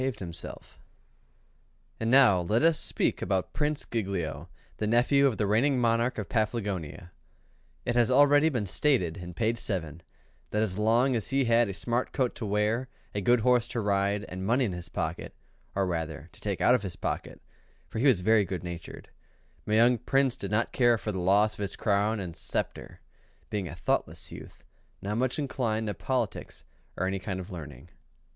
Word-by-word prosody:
And 115 - -1
now 125 -7 +6
let 105 - +1
us 165 -1 +4
speak - - 0
about 95 -1 -1
Prince 150 -1 -1
Giglio, 95 -8 -3 0.3
the 105 - -1
nephew 125 +5 +4
of 125 - -1
the 105 - +1
reigning 125 +7 +2
monarch 115 +1 +1
of 105 - -4
Paflagonia. 100 -6 -2 0.7
It 120 - 0
has 120 -1 +4
already 145 +3 +5
been 120 -8 -2
stated, 90 - +1
in 90 -1 -8
Chapter 110 -5 -1
II, 80 +3 -13 0.5
that 105 +1 +1
as 100 -2 -3
long 120 +4 +3
as 110 - -1
he 135 -1 +2
had 115 -1 +3
a - - -3
smart 120 +4 -1
coat 130 -3 0
to 110 - -4
wear, 105 +5 0 0.2
a 100 - -2
good 120 +4 +3
horse 125 0 +3
to 120 -1 -3
ride, 100 0 0
and 90 +1 -6
money 120 +6 +2
in 105 - -2
his 90 -1 -7
pocket - - -4 0.4
or 100 -1 +1
rather 80 -3 -4
to - - -19
take 100 -3 -3
out 125 - +5
of 125 - +3
his 95 -4 -6
pocket, - - -4 0.5
for - - -5
he 140 - +3
was 115 -9 +4
very 110 +2 +4
good 90 -2 -5
natured 85 -1 -8 0.6
my 105 - +2
young 120 +2 +5
Prince 135 +1 +2
did - - -6
not 110 +2 0
care 120 -2 +4
for 105 +1 -4
the 95 - -4
loss 100 +4 +3
of - - -15
his 100 -1 -3
crown 105 +1 +1
and 90 -4 -6
sceptre, - - -4 0.5
being 100 -4 -2
a 80 - -7
thoughtless 85 - -2
youth, - - -11 0.4
not 105 +2 -2
much 130 0 0
inclined 120 -6 -1
to 105 - -2
politics - - -3 0.3
or 95 - 0
any 95 +1 -1
kind 95 -1 -4
of 95 +2 -8
learning. 75 -4 -9
110 Hz, 185 wpm, -28 LUFS, 95-120 Hz, 0.7 s, now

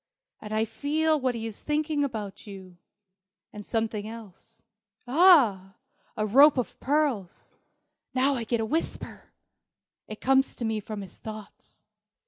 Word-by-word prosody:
And 210 - -9
I 215 +1 +1
feel 310 +6 0
what 255 -2 -1
he 225 -1 -4
is 220 -2 -7
thinking 300 0 0
about: 215 -7 -5
you 190 -3 -11 0.8
and 210 - -8
something 220 -1 -2
else. 225 -1 -12 0.4
Ah, 245 - +5 0.4
a 215 - 0
rope 275 +7 +6
of 250 - -3
pearls! 270 - -1 0.6
Now 265 +2 +3
I 245 -4 -2
get 235 +1 -1
a - - -1
whisper! 315 +9 -4 0.8
It 215 - -8
comes 270 +1 +2
to 240 - -4
me 220 -1 -1
from 210 0 -7
his 195 - -11
thoughts. 215 -2 -11
225 Hz, 140 wpm, -27 LUFS, 210-280 Hz, 0.8 s, rope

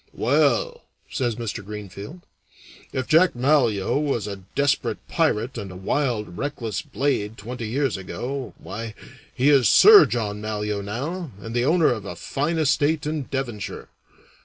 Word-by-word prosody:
"Well," 485 -1 +1 0.3
says 120 -5 -1
Mr. 110 -3 -5
Greenfield, 105 - -8 0.7
"if 130 -1 -2
Jack 170 +1 +4
Malyoe 125 -4 +2
was 140 -8 -1
a 100 -1 -5 0.2
desperate 140 0 +1
pirate 115 +4 0
and 100 -2 -6
a - - -10
wild, 105 -2 -2
reckless 120 -9 -3
blade 115 -6 -2
twenty 115 +2 -6
years 135 +1 0
ago, 125 +6 -5
why, 115 0 -7 0.4
he 135 +4 +3
is 135 -6 +5
Sir 420 -2 +9
John 105 -3 -2
Malyoe 105 -1 -2
now 150 - -4
and 115 +2 -7
the 120 +1 +2
owner 160 -2 +4
of 110 -4 -7
a 90 - -6
fine 145 - -2
estate 150 0 +2
in 150 -2 -2
Devonshire. 120 -7 -4
120 Hz, 145 wpm, -23 LUFS, 105-145 Hz, 0.7 s, Sir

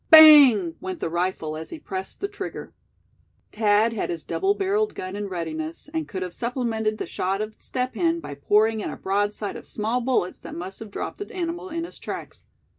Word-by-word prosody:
Bang! 285 - +9
went 185 -1 -4
the 165 - -2
rifle, 170 -3 -1
as 160 +1 -6
he - - -6
pressed 190 -9 -6
the 400 - 0
trigger. 410 0 -7 0.8
Thad 215 +1 +3
had 220 - -2
his 170 -2 -4
double 395 +1 +1
barreled 415 +2 0
gun 185 +1 -5
in 205 0 -3
readiness, 165 - -5
and 320 -2 -2
could 185 -3 -4
have 180 -2 -6
supplemented 230 -3 -1
the - - -3
shot 190 +2 -1
of 215 0 -3
Step 255 0 -2
Hen 170 -6 +1
by 145 -2 -7
pouring 215 +10 +3
in - - -3
a - - -6
broadside 205 +1 -1
of - - -9
small 225 +4 -1
bullets 240 -7 0
that - - -9
must 185 +3 -6
have 220 - -8
dropped - - -5
the 405 - -6
animal 350 0 -3
in 335 0 -3
his 340 - -8
tracks. - - -7
210 Hz, 200 wpm, -25 LUFS, 185-265 Hz, 0.8 s, Bang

